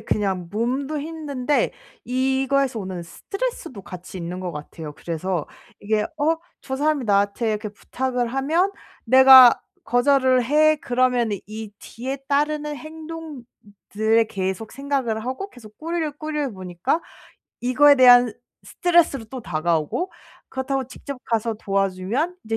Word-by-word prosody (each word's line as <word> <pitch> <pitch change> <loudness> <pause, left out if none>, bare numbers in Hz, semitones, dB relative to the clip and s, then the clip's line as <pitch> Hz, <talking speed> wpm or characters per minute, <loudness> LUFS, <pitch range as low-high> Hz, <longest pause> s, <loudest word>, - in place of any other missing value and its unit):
그냥 195 -5 -1
몸도 260 +8 -1
힘든데 295 -3 -1 0.3
이거에서 265 0 +1
오는 185 -3 -5
스트레스도 335 - -5
같이 180 0 -10
있는 175 +1 -5
것 180 -1 -4
같아요. 150 +1 -8
그래서 170 +1 -3 0.3
이게 210 +1 0 0.2
'어 315 +3 +2 0.2
저 265 - -5
사람이 295 -1 +1
나한테 205 +2 +1
이렇게 215 0 -3
부탁을 250 +4 -3
하면 315 +10 +1 0.3
내가 260 0 +9 0.2
거절을 255 +1 +3
해.' 310 +4 +4
그러면은 245 -5 +1
이 215 0 -7
뒤에 260 +4 -6
따르는 300 +1 0
행동들에 255 -8 -3
계속 190 +2 -3
생각을 265 -6 -2
하고 260 +11 -4
계속 215 - -15
꼬리에 330 -1 -2
꼬리를 300 -3 -2
무니까 185 - -2 0.6
이거에 270 +4 +5
대한 245 -2 +7 0.3
스트레스로 340 -8 +2
또 255 +3 -7
다가오고 165 - -1 0.4
그렇다고 265 0 -2
직접 275 +1 -8
가서 230 0 -1
도와주면 195 - -1
이제 225 0 -2
250 Hz, 305 characters per minute, -23 LUFS, 210-285 Hz, 0.6 s, 내가